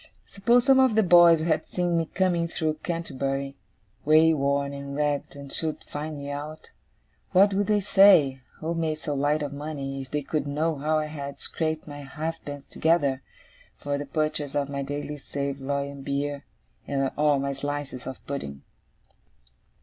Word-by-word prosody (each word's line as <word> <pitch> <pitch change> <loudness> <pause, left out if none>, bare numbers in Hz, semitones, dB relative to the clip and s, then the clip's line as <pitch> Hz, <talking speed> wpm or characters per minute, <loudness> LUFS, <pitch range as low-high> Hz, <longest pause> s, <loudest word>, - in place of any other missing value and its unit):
Suppose 235 +5 +2
some 270 -1 +6
of 260 -4 +4
the 220 - +5
boys 175 -3 +7
had 160 0 +1
seen 175 -1 -1
me 165 -1 +1
coming 175 -2 +1
through 155 -2 -2
Canterbury, 140 -5 -3 0.5
wayworn 140 -3 +3
and 140 0 -6
ragged, 145 -1 -1
and 140 -1 -8
should 160 -2 -3
find 150 +1 -5
me 140 0 -6
out? 150 +2 -7 0.6
What 195 +2 +6
would 200 +1 +1
they 210 -1 +3
say, 185 -10 +5
who 160 +2 -3
made 160 -2 -1
so 150 -1 -4
light 145 +2 +1
of 145 -1 -4
money, 140 -2 -5
if 130 - -9
they 150 +1 -2
could 145 0 -2
know 155 +3 0
how 155 +3 +1
I 155 - 0
had 140 -2 -7
scraped 160 -1 -3
my 145 -1 -8
halfpence 145 0 -6
together, 145 -5 +1 0.6
for 145 0 -3
the 145 - -5
purchase 155 -2 -2
of 145 -1 0
my 140 0 -3
daily 145 +2 -4
saveloy 140 0 -3
and 140 -1 -10
beer, 140 +1 -2 0.7
or 150 -1 +3
my 140 0 -1
slices 140 -2 -5
of 130 - -8
pudding? 70 - -5
145 Hz, 165 wpm, -26 LUFS, 140-160 Hz, 0.7 s, boys